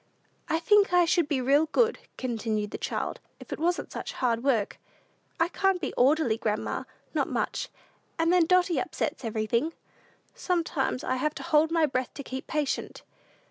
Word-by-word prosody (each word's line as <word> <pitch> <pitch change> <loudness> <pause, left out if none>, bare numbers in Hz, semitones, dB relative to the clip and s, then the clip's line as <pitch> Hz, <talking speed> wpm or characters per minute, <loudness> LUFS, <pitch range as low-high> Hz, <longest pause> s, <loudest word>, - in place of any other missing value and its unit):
"I 320 - +2
think 405 +3 +4
I 355 -1 +6
should 340 -2 +2
be 285 -4 0
real 285 +5 +3
good," 465 +7 +2 0.2
continued 220 -4 -2
the - - -5
child, - - -3 0.2
"if - - -8
it - - -5
wasn't 345 +2 0
such - - -5
hard 235 -2 0
work. 235 -7 +1 0.6
I 330 - +4
can't 385 +1 +1
be 290 - -3
orderly, 260 -3 +3
grandma 215 -2 -2 0.3
not - - 0
much; - - -2 0.5
and 330 +1 +2
then 350 -3 +4
Dotty 365 -1 +3
upsets 320 -5 -3
everything. 230 +7 0 0.6
Sometimes 330 -7 -1
I 255 - 0
have 300 +3 -1
to - - -6
hold 310 +1 +3
my 330 -1 +3
breath 255 -3 -2
to 280 - -6
keep 260 0 -6
patient. 300 -3 -2
300 Hz, 170 wpm, -28 LUFS, 255-340 Hz, 0.6 s, I